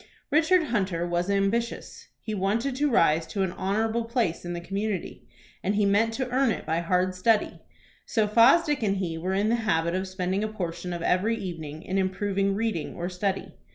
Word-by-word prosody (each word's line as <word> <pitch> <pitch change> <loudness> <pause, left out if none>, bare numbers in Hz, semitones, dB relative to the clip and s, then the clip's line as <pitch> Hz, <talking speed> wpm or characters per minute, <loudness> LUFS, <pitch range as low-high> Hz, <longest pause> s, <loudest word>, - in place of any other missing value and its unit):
Richard 325 +3 +4
Hunter 190 - -1
was 175 +2 -1
ambitious. 200 +4 -1 0.2
He 215 - -4
wanted 215 +7 0
to 295 +1 +2
rise 165 - +3
to 195 +3 -1
an 185 - -1
honorable 220 +5 -1
place 230 -8 -1
in 175 0 -4
the 175 - -3
community, 195 +1 -4 0.3
and 200 +2 0
he 205 0 +2
meant 205 +3 +3
to 260 0 -2
earn 260 0 +2
it - - -2
by 160 +1 0
hard 180 +2 +1
study. 210 +4 +1 0.5
So 220 -2 +1
Fosdick 270 +8 +5
and 200 -3 +1
he 170 -4 -3
were 185 +3 -1
in 205 +2 +1
the 235 - +2
habit 170 -7 0
of 185 +1 -1
spending 185 +1 -2
a - - 0
portion 180 -4 -5
of 170 -1 -4
every 210 +7 +1
evening 160 -6 -6
in 190 +1 -1
improving 195 +1 0
reading 215 -7 -2
or 175 +1 -3
study. 190 +1 -2
195 Hz, 190 wpm, -26 LUFS, 180-225 Hz, 0.5 s, Fosdick